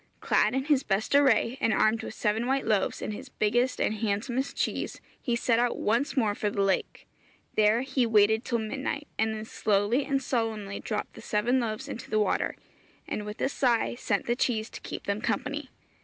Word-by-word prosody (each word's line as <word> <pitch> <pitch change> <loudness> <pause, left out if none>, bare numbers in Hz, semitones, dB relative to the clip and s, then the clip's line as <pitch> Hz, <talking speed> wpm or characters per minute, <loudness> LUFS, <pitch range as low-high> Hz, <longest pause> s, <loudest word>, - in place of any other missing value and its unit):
Clad - - +2
in 265 - +1
his 290 -3 +3
best 210 -2 -1
array, 265 -2 +4
and 225 - +3
armed 215 +1 +3
with - - -7
seven 220 +3 0
white 270 +1 +1
loaves 210 -3 +1
and 215 - -3
his - - -8
biggest 240 +4 +1
and - - +1
handsomest 230 +6 -1
cheese, - - -2 0.2
he 240 -4 0
set 230 0 +2
out 245 0 +1
once 235 +7 0
more 220 -5 +3
for 210 0 -1
the 200 -1 0
lake. 195 -1 -1 0.5
There 215 +3 +4
he 265 -2 +1
waited 220 +1 +4
till 235 - 0
midnight, 270 +6 -3
and 220 0 +1
then 215 0 -6
slowly 215 +5 +1
and 275 -1 +1
solemnly 225 -6 -2
dropped 210 -2 -4
the - - -11
seven 235 +5 +1
loaves 220 -3 -3
into 230 - -7
the 215 - +1
water, 210 - +1 0.5
and 210 0 -4
with 210 - -7
a - - +2
sigh 245 -4 +1
sent 230 -4 -1
the 240 - +1
cheese 225 -3 0
to - - -9
keep - - -6
them 200 +1 -2
company. 280 +6 -2
225 Hz, 200 wpm, -28 LUFS, 210-255 Hz, 0.5 s, array